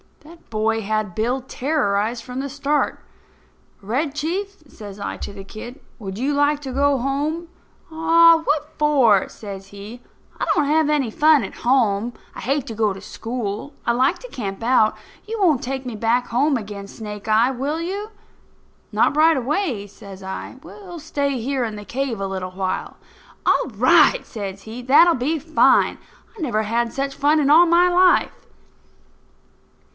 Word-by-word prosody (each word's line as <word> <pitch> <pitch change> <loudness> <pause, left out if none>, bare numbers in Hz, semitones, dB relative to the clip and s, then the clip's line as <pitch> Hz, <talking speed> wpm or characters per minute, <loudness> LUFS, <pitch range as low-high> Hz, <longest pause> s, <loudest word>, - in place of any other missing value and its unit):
That 330 +2 -17
boy 225 0 0
had 215 -2 -2
Bill 240 +7 -1
terrorized 235 -5 -1
from 250 +1 -6
the 280 +1 -3
start. 285 +2 -1 0.8
"Red 270 +9 -2
Chief," 380 +7 -3
says 205 -5 -11
I 200 - -4
to - - -6
the 195 -1 -9
kid, 240 +7 -10 0.2
"would 195 -3 -6
you 270 +5 0
like 290 +1 +2
to 270 -2 -6
go 280 +1 +2
home?" 290 +6 -2 0.4
"Aw, 330 +1 +6
what 295 -1 0
for?" 265 -10 +3
says 195 -2 -9
he. 205 +5 -10 0.4
"I - - 0
don't 295 - +2
have 305 +1 +2
any 280 -6 +1
fun 300 0 +4
at 195 - -6
home. 235 -3 +2 0.2
I - - -7
hate 275 +1 -1
to 225 - -6
go 215 -2 +1
to 190 - -10
school. 225 +3 -5
I - - +2
like 255 +3 +2
to - - -10
camp 200 - -5
out. 230 -3 +3 0.3
You 450 +1 -4
won't 320 -10 +3
take 265 +1 -4
me 245 -3 -5
back 230 +3 +1
home 270 +4 +2
again, 200 -2 -7
Snake 210 0 -8
eye, 220 +4 +3
will 280 +5 -3
you?" 400 +5 -4 0.8
"Not - - +2
right 315 0 +5
away," 265 - -1
says 195 -1 -12
I. 190 +6 -7
"We'll 360 -1 -10
stay 285 -3 -2
here 260 +2 -1
in 220 -2 -3
the 210 0 -9
cave 255 -3 -3
a 190 -1 -3
while." 185 0 -4 0.5
"All - - +3
right!" - - +4
says 195 -3 -7
he. 225 +3 -8
"That'll 295 +7 +5
be 285 +6 -1
fine. 315 +2 +3 0.4
I - - -9
never 235 -8 0
had 230 +2 -1
such 275 0 -3
fun 295 +2 +3
in 285 -2 +2
all 335 +3 +8
my 345 +2 +5
life." 360 0 +4
255 Hz, 170 wpm, -21 LUFS, 215-300 Hz, 0.8 s, all